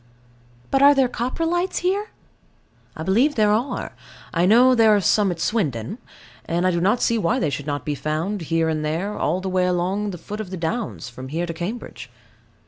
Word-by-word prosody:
But 270 - +3
are 285 +1 +7
there 265 -2 +4
Coprolites 330 - -1
here? 405 +3 0 0.9
I 160 - -4
believe 235 - +2
there 210 -2 +3
are: 235 +6 -2 0.4
I 175 +1 +2
know 245 +5 +6
there 225 -3 +5
are - - +3
some 200 +1 +2
at 175 -2 -4
Swindon; 165 - -1 0.5
and 175 +2 -1
I 185 - +3
do 170 -1 -1
not 205 +7 +2
see 230 -1 +2
why 170 -5 +1
they 155 - 0
should 140 +2 -5
not 145 -1 -3
be 150 - -1
found, 160 +8 -2
here 165 0 0
and 155 -1 -1
there, 170 +7 -2
all 175 +5 -1
the 190 - -4
way 185 -1 +1
along 185 +4 0
the 180 - -6
foot 205 +6 -7
of 205 - -7
the 190 - -5
downs, 200 - -3
from 130 +2 -9
here 165 +5 -2
to 170 - -5
Cambridge. 180 +9 -6
190 Hz, 205 wpm, -22 LUFS, 165-230 Hz, 0.9 s, are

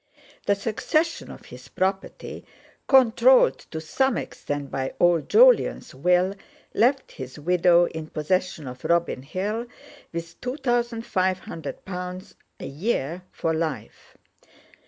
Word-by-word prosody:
The 200 - +4
succession 310 +11 -1
of - - -11
his - - -12
property, 190 +1 -3 0.4
controlled 475 - +5
to 160 - -5
some 250 +11 0
extent 145 -1 -5
by 130 0 -3
old 175 -2 +3
Jolyon's - - +4
Will, 180 +7 +2 0.4
left 260 +3 +2
his 130 -1 -9
widow 175 +2 +4
in 160 -2 -6
possession 165 +1 -1
of 125 0 -9
Robin 170 -6 +1
Hill, 205 - -3 0.4
with 170 0 -7
two 250 +3 -3
thousand 240 -4 -1
five 185 -4 +1
hundred 160 -4 -8
pounds 180 0 -6 0.3
a - - -6
year 170 - -2
for 165 - -1
life. 160 -3 -5
180 Hz, 125 wpm, -25 LUFS, 160-235 Hz, 0.4 s, controlled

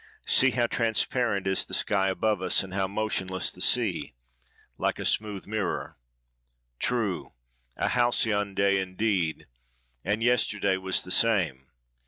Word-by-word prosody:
See 135 - +5
how 120 -1 +1
transparent 115 -2 0
is 95 0 +3
the - - -2
sky 95 -1 +2
above 105 +1 0
us, 95 0 +1
and 95 -1 -10
how 95 -1 0
motionless 95 -2 -1
the - - -7
sea!—like - - -2
a - - -5
smooth 105 -3 -1
mirror." 105 -3 -3 0.8
True! 115 -7 -2 0.4
A - - 0
Halcyon 110 -5 +1
day, 100 -1 +2
indeed! 95 -3 -1 0.6
and 105 +5 -1
yesterday 105 -5 +1
was 95 0 0
the 90 - -7
same. 85 - +1
100 Hz, 130 wpm, -27 LUFS, 95-110 Hz, 0.8 s, See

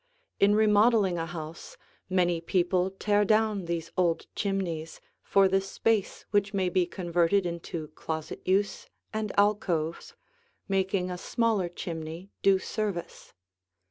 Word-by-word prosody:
In 205 +1 +5
remodeling 210 -3 +4
a 165 - -2
house 160 0 -8 0.3
many 175 -2 +2
people 180 +1 +1
tear 205 +2 +1
down 215 -2 +2
these 170 -1 -3
old 175 -3 +1
chimneys 180 -6 -2 0.2
for 195 -1 +4
the 195 0 +2
space 200 +1 -1
which 205 0 +1
may 190 -2 +1
be 180 0 +1
converted 175 +1 +1
into 170 -2 -5
closet 160 0 -5
use 195 +1 0 0.3
and 215 -1 -2
alcoves, 195 - +1 0.5
making 190 -1 0
a 180 - -5
smaller 220 -4 0
chimney 170 +2 -6
do 195 -1 +5
service. 195 -2 -4
185 Hz, 125 wpm, -28 LUFS, 170-205 Hz, 0.5 s, In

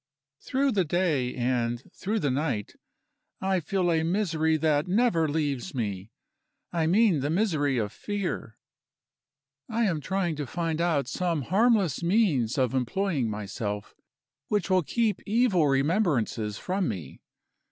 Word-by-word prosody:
Through 270 +1 0
the 200 -5 +2
day, 155 -7 0
and 120 -1 -1
through 210 +3 -2
the 140 - +1
night, 130 -7 -2 0.7
I 190 -1 +1
feel 175 +2 0
a 160 -1 +2
misery 160 -3 +1
that 150 0 +1
never 180 -5 +2
leaves 145 +1 -2
me 100 -4 -3 0.6
I 165 -2 +1
mean 195 -2 +4
the 140 +2 -1
misery 155 - +1
of 105 -3 -1
fear. 200 - -4 1.1
I 230 +1 0
am 170 -8 0
trying 185 -1 -1
to 145 -2 -4
find 165 +2 -2
out 160 -7 +1
some 165 +1 -1
harmless 200 - +2
means 170 - +2
of 130 -3 +1
employing 135 - 0
myself, 105 0 -4 0.5
which 200 -3 0
will 185 0 +5
keep 220 - 0
evil 205 -7 +3
remembrances 135 - +1
from 185 0 -1
me. 85 -11 -6
160 Hz, 135 wpm, -27 LUFS, 130-190 Hz, 1.1 s, will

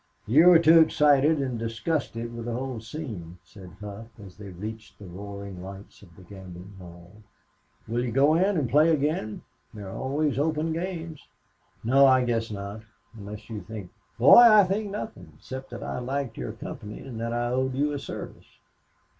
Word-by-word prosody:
"You 150 +10 +5
were 180 -2 +9
too 165 0 +6
excited 150 -1 +4
and 130 -4 -2
disgusted 115 +1 -3
with 115 -1 -6
the 120 - -3
whole 130 -1 -4
scene," 110 - -8
said 95 -4 -14
Hough 105 +2 -8 0.2
as 95 - -13
they 105 -2 -10
reached 105 +4 -8
the 105 - -12
roaring 100 0 -8
lights 95 +2 -11
of 85 -5 -18
the 95 - -15
gambling 95 0 -11
hell. 85 0 -13 0.8
"Will 120 +2 -1
you 120 - -3
go 140 +5 +4
in 190 +3 +2
and 145 -5 0
play 150 +7 +4
again? 145 -8 -1 0.3
There 105 -2 -8
are 95 - -8
always 140 +1 -1
open 160 +1 0
games." 165 -3 -5 0.6
"No, 135 +4 +5
I 130 -1 +4
guess 115 -1 -1
not 100 +1 -6 0.3
unless 105 0 -9
you 110 -3 -6
think 100 -1 -9
" - - -40
"Boy, 120 +4 +8
I 215 -4 +8
think 200 +3 -2
nothing 205 - -7
except 130 +9 -8
that - - -8
I - - -4
liked 130 -1 -3
your - - -5
company 105 0 -8
and 125 -4 -8
that 115 0 -2
I 120 0 -1
owed 130 +1 -1
you 145 +2 0
a 145 - -3
service. - - -9
120 Hz, 185 wpm, -26 LUFS, 100-150 Hz, 0.8 s, were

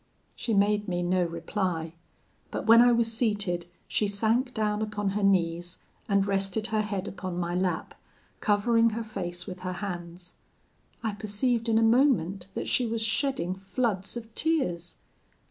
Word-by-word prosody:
"She 225 - -1
made 205 +1 +2
me 175 -1 -1
no 180 +1 +2
reply; 170 -1 -2 0.6
but - - -4
when 230 +1 +8
I 245 0 +6
was 230 -1 +2
seated, 205 -7 0 0.2
she 210 - +1
sank 225 +5 +1
down 210 -2 -1
upon 210 -2 -1
her 210 +2 -1
knees, 175 -3 +1 0.3
and 200 -1 +3
rested 195 +2 0
her 215 - +3
head 200 -2 -3
upon 185 -2 -5
my 175 0 -2
lap, 180 -2 -1 0.5
covering 230 +2 +3
her 230 - -2
face 180 -5 -5
with 185 -3 -7
her 185 0 -4
hands. 175 -2 -6 0.7
I 220 -2 -1
perceived 225 +3 0
in 220 - +3
a 225 - +4
moment 225 - +3
that - - -3
she 245 - +2
was 225 0 -1
shedding 225 - 0
floods 195 +2 -2
of 225 -1 -9
tears. 240 - 0
205 Hz, 160 wpm, -28 LUFS, 180-225 Hz, 0.7 s, when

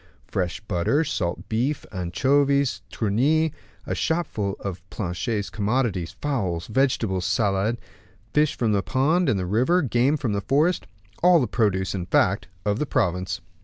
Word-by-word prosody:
Fresh 90 -1 -2
butter, 105 - +1
salt 90 - -3
beef, 130 +6 -1
anchovies, 140 +9 +1
tunny, 140 +9 +1 0.3
a - - -2
shopful 110 - -1
of 95 -2 -5
Planchet's 100 +3 -3
commodities, 105 -5 -1
fowls, 95 - -1
vegetables, 110 -6 +1
salad, 100 +3 +1 0.6
fish 150 0 +3
from 115 -3 +1
the 100 -2 +2
pond 155 - +2
and 105 - +2
the 90 - -2
river, 130 - +2
game 130 +4 +2
from 120 -7 -2
the 100 - -1
forest 150 - +1 0.3
all 180 -1 +6
the 130 - +1
produce, 95 -5 0
in 90 -3 -4
fact, 95 +2 +2 0.2
of 105 +2 +1
the 150 - -1
province. 90 -4 0
110 Hz, 145 wpm, -24 LUFS, 95-140 Hz, 0.6 s, all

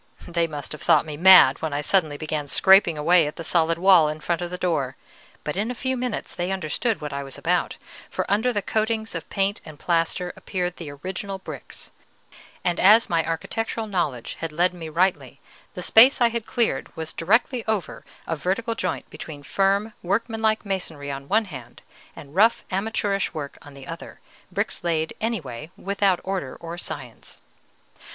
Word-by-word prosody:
They 170 -1 0
must 145 -3 -7
have 150 - -6
thought - - +4
me 155 -2 -6
mad 175 -5 +7
when 160 -2 -2
I 145 - -1
suddenly 155 -3 +1
began 155 -1 -3
scraping 190 0 +5
away 165 +1 +4
at 150 - -6
the 165 - -7
solid 165 0 +2
wall 180 -4 +6
in 155 +1 -5
front 170 +2 -2
of 175 - -3
the 180 - -5
door; 145 -8 -1 0.5
but 150 - -3
in 210 +4 -1
a 250 - -3
few 260 +2 -1
minutes 250 0 -3
they 175 +2 -2
understood 190 +5 -1
what 150 -1 -5
I 140 - -3
was 135 -1 -7
about, - - 0 0.3
for - - -2
under 220 +5 +2
the 205 -4 -2
coatings 220 +1 -1
of 165 -2 -6
paint 200 +2 0
and 155 -2 -11
plaster 170 +2 0
appeared 180 -2 -3
the 165 -4 -7
original 190 +6 -5
bricks; 190 - -10 0.7
and 175 -1 0
as 215 +3 +6
my 165 -1 +2
architectural 220 +8 -3
knowledge 170 - -2
had 165 -1 -3
led 175 +4 +1
me 165 -3 -7
rightly, 180 +4 0 0.4
the - - -5
space 245 +5 +7
I 240 -1 +5
had 230 -1 -4
cleared 230 - 0
was 160 -1 -4
directly 225 +7 +1
over 215 -4 -2 0.2
a 165 - -2
vertical 195 - -1
joint 185 -5 -3
between 145 -3 -9
firm, 195 - +1
workmanlike 220 +3 0
masonry 165 -7 -4
on 140 0 -7
one 220 +5 +2
hand, 130 - -10 0.3
and 145 -1 -12
rough 215 +6 +4
amateurish 200 -1 -1
work 145 -2 -6
on 145 -1 -13
the 135 -1 -11
other, - - -9 0.3
bricks - - -2
laid 160 -2 0
anyway, 160 - -3
and - - -17
without 195 -2 +2
order 185 -9 -3
or 170 0 -6
science. 125 -9 -8
180 Hz, 185 wpm, -24 LUFS, 155-205 Hz, 0.7 s, mad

